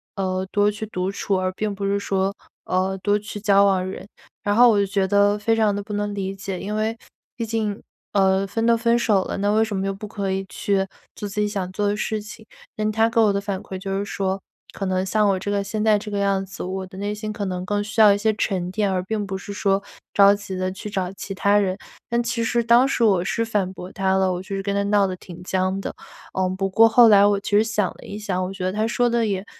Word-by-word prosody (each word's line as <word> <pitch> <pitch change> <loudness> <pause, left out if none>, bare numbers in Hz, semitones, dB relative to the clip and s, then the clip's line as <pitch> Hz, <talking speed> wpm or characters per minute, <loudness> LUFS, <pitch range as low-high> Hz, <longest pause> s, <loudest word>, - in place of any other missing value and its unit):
呃， 185 -1 -1
多 205 0 +3
去 215 +1 -6
独 185 -2 -2
处， 200 0 -1
而 185 0 -1
并 210 +1 -2
不 200 - -6
是 200 0 +1
说， 195 0 0 0.3
呃， 190 +1 0
多 205 +1 +1
去 210 0 -7
交 200 -1 +5
往 190 -2 +2
人。 190 +1 -7 0.4
然 205 0 +1
后 245 +1 +7
我 210 - +4
就 200 - +3
觉 195 0 0
得 205 +1 +3
非 225 +2 +1
常 215 -2 +2
地 205 - -3
不 210 - -7
能 205 0 -2
理 195 -1 -3
解， 195 -1 -5
因 210 +2 -4
为 220 +1 -1 0.4
毕 230 - -3
竟， 215 -2 -2 0.3
呃， 195 0 +3
分 225 +3 -1
都 235 0 +5
分 235 +1 +2
手 205 -5 +2
了， - - -4
那 205 +1 +1
为 220 +1 +3
什 210 -3 -3
么 190 - -1
又 195 - -1
不 200 +2 -8
可 200 -2 -3
以 190 0 -1
去 200 -1 -1 0.4
做 205 - -5
自 200 - -4
己 210 - +1
想 195 -3 -3
做 205 +2 -1
的 205 - +1
事 215 0 -2
情？ 210 - -11 0.3
那 215 0 0
她 225 +1 +3
给 230 0 +1
我 215 -2 +5
的 200 - 0
反 200 -1 -4
馈 190 - -7
就 195 +1 -3
是 - - -1
说 195 -1 -2 0.3
可 195 - -3
能 185 0 0
像 210 +1 +2
我 195 - +2
这 205 +2 -3
个 200 -1 0
现 210 +1 -3
在 215 -1 +4
这 210 - -8
个 205 - -3
样 195 -1 +1
子 195 - -8
我 190 +1 -4
的 185 0 -12
内 205 +1 -2
心 215 0 -5
可 210 -1 -4
能 180 -1 -3
更 205 +1 -1
需 220 +1 0
要 210 -2 +8
一 - - 0
些 220 +1 +1
沉 185 -4 -2
淀， 205 -1 0
而 185 -1 -1
并 205 +1 -3
不 195 - -3
是 200 +1 -8
说 200 -1 +1 0.3
着 200 0 +7
急 200 -2 -5
的 185 0 -1
去 190 +3 -7
找 190 -2 -2
其 195 0 -7
他 200 +2 +3
人。 190 -1 0 0.3
但 235 0 +1
其 235 0 -1
实 235 +1 +1
当 235 +3 +5
时 255 - 0
我 195 -6 +4
是 230 +5 -1
反 205 -4 -1
驳 185 0 -9
她 190 0 0
了， 190 -1 +2
我 180 - -4
就 195 +1 -6
是 195 - -3
跟 200 - -1
她 200 - +1
闹 205 -1 +3
得 185 - -4
挺 180 0 -11
僵 185 +1 0
的。 - - -5 0.4
嗯， 185 0 0
不 195 0 -1
过 225 +4 +6
后 230 0 +7
来 200 -1 +7
我 205 -1 +2
其 200 - -7
实 215 - +6
想 210 -3 0
了 - - -17
一 205 - -7
想， 190 -3 -2
我 185 - -3
觉 185 -1 -4
得 185 - -1
她 215 +2 0
说 245 +1 +1
的 235 -2 +1
也 195 -1 -2
200 Hz, 290 characters per minute, -23 LUFS, 190-215 Hz, 0.4 s, 要